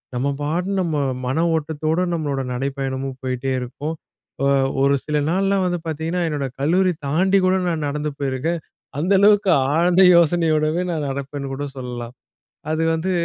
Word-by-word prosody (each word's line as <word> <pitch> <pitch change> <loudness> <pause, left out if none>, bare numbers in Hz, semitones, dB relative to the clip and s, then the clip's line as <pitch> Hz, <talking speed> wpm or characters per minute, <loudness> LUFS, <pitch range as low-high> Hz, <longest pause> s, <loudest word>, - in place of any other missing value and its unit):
நம்ம 130 +3 0
பாட்டுக்கு, 180 +6 -1
நம்ம 165 -4 -1 0.3
மன 160 +7 +1
ஓட்டத்தோட 155 +1 -1
நம்மளோட 145 -5 -1
நடைப்பயணமும் 135 0 -3
போயிட்டே 130 +1 -2
இருக்கும். 145 +6 -5 0.5
அ - - +3 0.4
ஒரு 140 0 +4
சில 150 -1 0
நாள்லாம் 195 0 +1
வந்து 175 -1 -1
பாத்தீங்கன்னா, 160 +3 -2
என்னோட 145 -3 -2
கல்லூரி 180 +5 +3
தாண்டி 185 +7 +3
கூட, 185 - +3
நான் 160 -3 -2
நடந்து 150 +1 -2
போயிருக்கன். 140 +5 -1 0.4
அந்த 175 +6 0
அளவுக்கு 205 0 +5 0.2
ஆழ்ந்த 175 +3 +4
யோசனையோடவே 165 -1 +3
நான் 155 -3 -2
நடப்பேன்னு 140 0 -5
கூட 145 +2 -4
சொல்லலாம். 120 -2 -6 0.6
அது 160 +1 0
வந்து 165 +4 -2
155 Hz, 145 wpm, -21 LUFS, 140-175 Hz, 0.6 s, அளவுக்கு